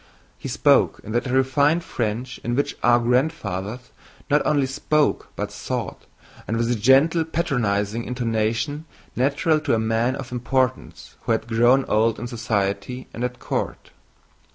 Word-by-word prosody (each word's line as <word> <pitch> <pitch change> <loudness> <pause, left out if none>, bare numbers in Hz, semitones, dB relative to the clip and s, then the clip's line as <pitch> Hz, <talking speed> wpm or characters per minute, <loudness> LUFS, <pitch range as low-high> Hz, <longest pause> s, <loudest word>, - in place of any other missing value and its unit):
He - - -6
spoke - - +3
in 110 - -8
that 120 +3 0
refined 140 +5 +2
French 120 0 -3
in 120 +1 -1
which 140 - -1
our 120 0 +5
grandfathers 120 - -1 0.4
not 150 - +4
only 145 -3 +2
spoke 145 +3 0
but - - -4
thought, - - -5 0.4
and 115 - -1
with 115 0 0
the 120 - +2
gentle, 135 +9 +4
patronizing 120 -10 -1
intonation 120 +5 -1 0.3
natural 145 +5 +2
to 150 - +1
a - - +1
man 115 +3 +1
of 135 -3 -7
importance 130 +1 -2
who 115 - 0
had 110 0 -1
grown 120 +4 +3
old 110 +1 +2
in 120 - -5
society 115 0 -2
and 120 - -5
at 125 0 -3
court. - - -4
125 Hz, 150 wpm, -23 LUFS, 115-135 Hz, 0.4 s, our